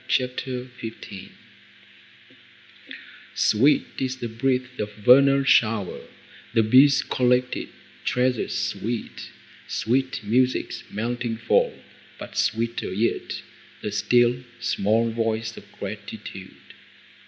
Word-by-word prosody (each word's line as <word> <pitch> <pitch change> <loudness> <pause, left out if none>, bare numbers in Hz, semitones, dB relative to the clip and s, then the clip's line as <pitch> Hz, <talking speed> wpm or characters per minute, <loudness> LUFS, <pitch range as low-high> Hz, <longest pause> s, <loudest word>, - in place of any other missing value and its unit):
CHAPTER 125 0 -1
XV 105 -4 -8 2.1
Sweet 130 +8 +4
is 130 -1 -2
the 120 -2 -5
breath 125 +2 -1
of 105 0 -3
vernal 135 +5 +6
shower, 110 -7 +2 0.6
The 115 - +5
bees' 135 +5 +6
collected 125 0 +1 0.3
treasures 125 -1 0
sweet, 115 +1 -4 0.4
Sweet 130 +1 -1
music's 125 +5 +1
melting 115 +1 -3
fall, 110 - +1 0.3
but - - -9
sweeter 115 +2 -1
yet 105 +5 -1 0.4
The 105 - -2
still, 120 +4 +3 0.2
small 115 -1 +1
voice 115 -1 -2
of - - -13
gratitude. - - -9
120 Hz, 95 wpm, -24 LUFS, 110-125 Hz, 2.1 s, vernal